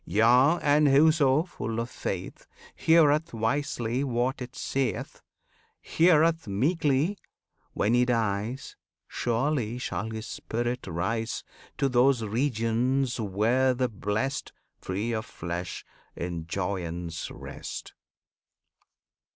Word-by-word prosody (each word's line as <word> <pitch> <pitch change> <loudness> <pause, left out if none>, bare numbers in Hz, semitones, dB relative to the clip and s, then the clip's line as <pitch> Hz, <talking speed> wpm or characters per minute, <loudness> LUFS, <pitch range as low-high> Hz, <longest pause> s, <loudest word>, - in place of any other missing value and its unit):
Yea, 125 - +4
and 145 +1 +4
whoso, 145 0 +5
full 115 -10 -5
of 115 - -2
faith, - - -5 0.3
Heareth 160 -3 +3
wisely 120 +1 -1
what 130 0 -1
it 125 +1 -7
saith, 135 -1 -2 0.6
Heareth 165 -3 +3
meekly, 145 - +1 0.5
when 105 +3 +1
he 120 0 +4
dies, 115 +1 -1 0.3
Surely 120 -1 -1
shall 110 -2 -3
his 110 0 -5
spirit 120 +1 -3
rise 110 +7 -2 0.3
To 140 - +2
those 125 -1 +3
regions 120 +2 0
where 115 +6 +2
the 125 0 0
Blest, 110 +6 -2 0.3
Free 100 +5 -3
of 110 -1 -3
flesh, 85 +1 -5 0.3
in 85 -2 -4
joyance 85 -3 -3
rest. - - -8
120 Hz, 100 wpm, -27 LUFS, 110-140 Hz, 0.6 s, whoso